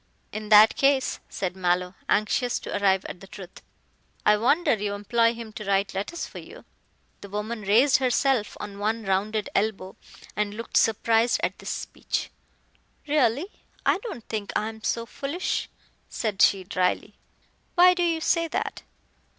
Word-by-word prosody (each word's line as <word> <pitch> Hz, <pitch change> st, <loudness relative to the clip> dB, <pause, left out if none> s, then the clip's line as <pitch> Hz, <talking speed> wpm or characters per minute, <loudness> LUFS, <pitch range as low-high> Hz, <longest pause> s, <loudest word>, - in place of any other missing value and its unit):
"In 215 Hz, 0 st, -6 dB
that 215 Hz, 0 st, +8 dB
case," 275 Hz, -1 st, +2 dB
said 185 Hz, -1 st, -3 dB
Mallow, 180 Hz, 0 st, 0 dB, 0.2 s
anxious 240 Hz, +4 st, +1 dB
to -, -, -5 dB
arrive 195 Hz, -2 st, +2 dB
at 165 Hz, -, -7 dB
the 195 Hz, -, -13 dB
truth, 190 Hz, -2 st, -11 dB, 0.6 s
"I 210 Hz, -, +6 dB
wonder 265 Hz, +11 st, +2 dB
you 205 Hz, -2 st, -2 dB
employ 230 Hz, +3 st, +2 dB
him 230 Hz, -2 st, -9 dB
to 215 Hz, -, -7 dB
write 195 Hz, 0 st, +1 dB
letters 205 Hz, -, -4 dB
for -, -, -10 dB
you." -, -, -13 dB, 0.6 s
The 200 Hz, -, -10 dB
woman 210 Hz, +3 st, -4 dB
raised 230 Hz, +8 st, +4 dB
herself 255 Hz, -3 st, +1 dB
on 200 Hz, -1 st, -7 dB
one 220 Hz, +2 st, -1 dB
rounded 205 Hz, +2 st, 0 dB
elbow 195 Hz, -2 st, -1 dB, 0.4 s
and 210 Hz, 0 st, -1 dB
looked 230 Hz, +1 st, -7 dB
surprised 225 Hz, +1 st, +3 dB
at -, -, -1 dB
this -, -, -7 dB
speech. -, -, -4 dB, 0.8 s
"Really, 285 Hz, 0 st, +2 dB, 0.4 s
I -, -, +3 dB
don't 405 Hz, -, -8 dB
think 210 Hz, -2 st, -4 dB
I 215 Hz, +1 st, 0 dB
am 220 Hz, 0 st, -11 dB
so 230 Hz, 0 st, -1 dB
foolish," 285 Hz, +9 st, -3 dB, 0.4 s
said 210 Hz, -4 st, -2 dB
she 195 Hz, -2 st, +5 dB
dryly. 185 Hz, +3 st, -1 dB, 0.6 s
"Why 360 Hz, 0 st, +7 dB
do 360 Hz, -, -2 dB
you 335 Hz, -2 st, +1 dB
say 335 Hz, 0 st, +2 dB
that?" -, -, -3 dB
215 Hz, 160 wpm, -25 LUFS, 200-245 Hz, 0.8 s, that